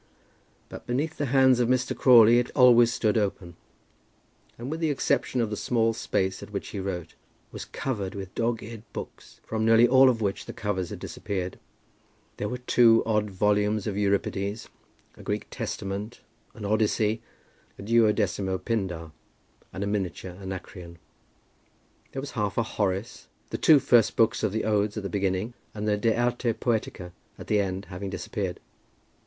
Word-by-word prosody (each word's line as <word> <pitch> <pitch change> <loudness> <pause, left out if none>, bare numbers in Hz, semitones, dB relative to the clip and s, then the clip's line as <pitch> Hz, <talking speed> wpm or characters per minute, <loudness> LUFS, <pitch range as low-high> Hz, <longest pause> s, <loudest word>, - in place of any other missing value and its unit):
But - - -11
beneath 145 +6 -1
the 145 - 0
hands 130 -1 +4
of 120 -1 +2
Mr. 130 0 +1
Crawley 120 -2 +7
it 120 - -2
always 120 -3 +6
stood 110 -2 +1
open; 95 -4 -3 1.0
and 120 +4 -6
with 160 - -3
the 160 -2 +1
exception 130 -2 0
of 110 -2 -1
the - - -1
small 115 0 +1
space 95 -4 -1
at - - -9
which 100 -1 -5
he 100 - -5
wrote, 90 -4 -5 0.4
was - - -7
covered 105 -8 -4
with 95 -2 -7
dog's 115 0 -1
eared 110 0 -8
books, - - -9
from 110 0 -2
nearly 115 +1 +6
all 130 +1 +6
of 120 -3 0
which 100 -3 -2
the - - -7
covers 95 -4 -3
had - - -6
disappeared. 95 -2 -5 0.8
There 105 - -3
were 125 - -3
there 125 - -24
two 115 -2 +5
odd 105 -1 +1
volumes 105 +1 +1
of 105 - -2
Euripides, 100 +1 -1 0.5
a - - -12
Greek - - -3
Testament, 100 +3 -5 0.3
an 105 - -7
Odyssey, 110 +1 +1 0.6
a - - -9
duodecimo 105 -4 +2
Pindar, 90 -8 -3 0.6
and 95 - -4
a - - -2
miniature 95 -3 -3
Anacreon. 90 -2 -8 1.1
There 135 - -4
was 145 - -6
half 105 -4 -2
a 115 - +3
Horace, 105 +1 -3 0.2
the - - -3
two 155 - +7
first 125 -4 +3
books 115 0 +2
of 110 - 0
the 110 +2 -2
Odes 105 0 0
at 105 - -4
the 100 - -3
beginning, 100 +3 -1 0.2
and 105 0 -3
the 105 - +3
De 110 +2 +1
Arte 120 -1 +1
Poetica 110 -6 -2 0.3
at - - -9
the 105 - +2
end 95 0 -2
having 95 +1 -5
disappeared. 95 -1 -4
105 Hz, 170 wpm, -26 LUFS, 100-115 Hz, 1.1 s, Crawley